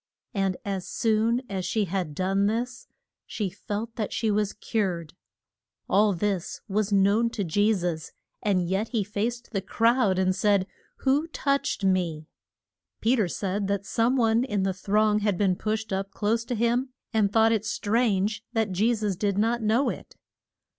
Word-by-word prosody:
And 195 -3 0
as 195 -2 -3
soon 225 +2 +1
as 190 -2 -3
she 215 +2 0
had 175 -5 -3
done 195 +3 +1
this 245 +3 -3 0.4
she 205 -4 -3
felt 215 +3 -5
that 215 -3 -2
she 225 -2 0
was 210 -1 0
cured. 185 -8 -2 0.7
All 210 +1 +4
this 190 -1 -2
was 210 0 0
known 200 +4 +3
to 220 -3 -3
Je 205 +5 +2
sus, 175 -6 -2 0.3
and 185 -4 +1
yet 195 +5 0
he 225 -3 0
faced 225 +4 -3
the 195 -4 -1
crowd 225 0 +2
and 185 0 +2
said, 200 -1 +2 0.4
Who 280 +4 +2
touched 280 -8 -1
me? 175 -5 0 0.7
Pe 235 +3 +3
ter 215 -7 +1
said 195 +3 -2
that 200 0 -1
some 230 +5 +1
one 230 0 +3
in 210 -7 -1
the 190 0 0
throng 210 +3 +2
had 205 -3 0
been 190 -2 +2
pushed 220 +1 -2
up 195 +1 -2
close 225 +3 -1
to 245 - -2
him 240 +3 +1 0.2
and 210 -3 +2
thought 225 +1 +4
it 220 -2 +1
strange 215 -2 0
that 220 -4 0
Je 215 +6 +2
sus 210 -3 -1
did 200 +1 -1
not 230 +3 +1
know 225 +6 +2
it. - - -7
210 Hz, 170 wpm, -26 LUFS, 195-225 Hz, 0.7 s, All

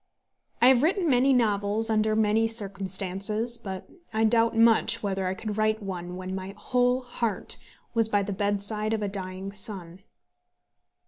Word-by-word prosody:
I - - +8
have 255 -2 +5
written 350 +3 +1
many 265 -1 +4
novels 220 -2 +1
under 215 0 +2
many 220 +1 +2
circumstances; 200 +2 -2
but 190 -4 -7 0.2
I 220 0 0
doubt 230 0 +3
much 230 0 +4
whether 195 -2 -1
I 185 - -2
could 210 +1 -5
write 215 0 +1
one 180 -2 -5
when 185 0 -6
my 190 +1 -6
whole 250 +2 +1
heart 240 -4 -3 0.4
was 225 -1 +2
by 205 -2 +2
the 200 0 -3
bedside 205 +2 0
of 215 -1 -1
a - - 0
dying 190 0 -3
son. 190 -4 -3
215 Hz, 155 wpm, -26 LUFS, 195-230 Hz, 0.4 s, I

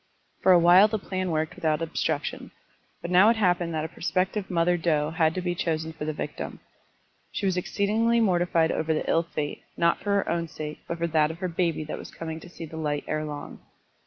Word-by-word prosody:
For 190 - +5
a 180 - +8
while 175 +4 +7
the 220 0 -1
plan 185 -2 -3
worked 155 -1 -1
without 155 -2 0
obstruc 165 -1 -1
tion, - - -6 0.5
but 170 - -4
now 185 +4 +7
it 230 - +4
happened 175 -5 +1
that 155 0 -1
a - - -2
prospective 185 +4 -1
mother 175 0 +2
doe 155 -3 +1
had 160 -1 +2
to 185 - -1
be 175 -1 0
chosen 160 -2 -2
for 155 -2 -6
the 155 - -1
victim. - - -5 0.7
She 205 - -3
was 190 -2 +2
exceedingly 215 +5 +1
mortified 175 -5 +2
over 160 0 0
the - - -2
ill 165 - +3
fate, 150 -3 -4 0.2
not 170 0 +3
for 200 0 0
her 200 - +1
own 170 0 -1
sake, 150 -1 -7
but 170 - -3
for 170 - -1
that 155 -2 +2
of 160 - -6
her 185 +1 -2
baby 170 -2 -1
that 155 - -6
was - - -9
coming 160 -1 -6
to 175 - -12
see 170 -1 -8
the 160 +1 -9
light 150 -2 -2
ere 155 0 -1
long. 150 -1 -7
170 Hz, 225 wpm, -26 LUFS, 160-185 Hz, 0.7 s, a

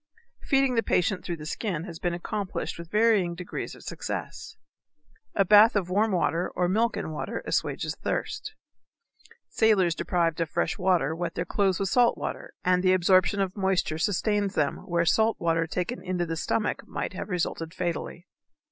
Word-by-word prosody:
Feeding 270 -1 +2
the 230 - +3
patient 180 -3 0
through 170 - -4
the 150 - -9
skin 170 0 -3
has 170 -3 -8
been 175 -1 -1
accomplished 195 0 -4
with 170 -1 -8
varying 210 -5 +3
degrees 180 +1 -6
of - - -15
success. - - -6 0.8
A 195 - +3
bath 210 +4 +7
of 185 -3 0
warm 210 +3 +2
water 175 -1 0
or 180 - +1
milk 225 +6 +1
and 160 - -4
water 150 - -4
assuages - - -1
thirst. 420 - -3 0.9
Sailors 200 -6 +3
deprived 170 -1 0
of 165 - -1
fresh - - 0
water 180 -5 +2
wet 170 0 -4
their 170 - -2
clothes 190 0 +1
with 195 -1 0
salt 245 +2 +3
water, - - -6
and 180 0 +3
the 185 0 +4
absorption 185 +1 +3
of 195 -1 -1
moisture 190 -5 0
sustains 205 +2 0
them 145 -2 +1
where 170 -1 +1
salt 220 +6 +2
water 165 -1 +1
taken 180 +9 -3
into 180 -1 -2
the 165 -1 -3
stomach 205 +7 -1
might - - -4
have 185 - -6
resulted 165 -2 -2
fatally. 175 -1 -4
180 Hz, 175 wpm, -27 LUFS, 170-205 Hz, 0.9 s, bath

